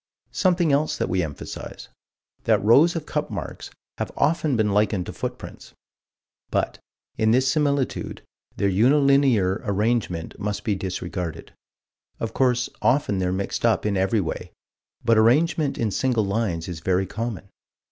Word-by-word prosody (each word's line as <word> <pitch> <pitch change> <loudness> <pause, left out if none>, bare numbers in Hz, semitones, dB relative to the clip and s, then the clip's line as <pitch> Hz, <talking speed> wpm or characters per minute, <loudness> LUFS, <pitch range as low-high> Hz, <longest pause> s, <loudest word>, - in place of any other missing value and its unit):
Something 175 -4 +2
else 145 +2 +1
that - - -1
we 90 0 +1
emphasize: 75 -4 -7 0.6
That - - +3
rows 145 +11 +5
of 165 - -3
cup - - -2
marks - - -6 0.3
have - - -3
often 155 -2 +1
been 105 -2 +2
likened 105 -2 +1
to - - -7
footprints. - - -7 0.8
But, - - -1 0.4
in 110 - +3
this 130 +3 +3
similitude, 145 -3 -1 0.3
their 100 - +1
unilinear 125 -2 +3
arrangement 100 -5 -1
must 105 0 -3
be 105 - 0
disregarded 90 -3 -5 0.7
of 115 0 -3
course 125 -2 +2
often 125 -7 +2
they're 90 -1 0
mixed 95 +1 -3
up 110 -6 +2
in 105 -1 +1
every 95 +3 +2
way, 80 - -5 0.5
but 115 -1 +5
arrangement 145 +5 +3
in 110 -3 0
single 120 +1 +1
lines 100 -5 -1
is 85 -3 -5
very 95 +3 +1
common. 110 -1 -5
110 Hz, 145 wpm, -24 LUFS, 95-135 Hz, 0.8 s, rows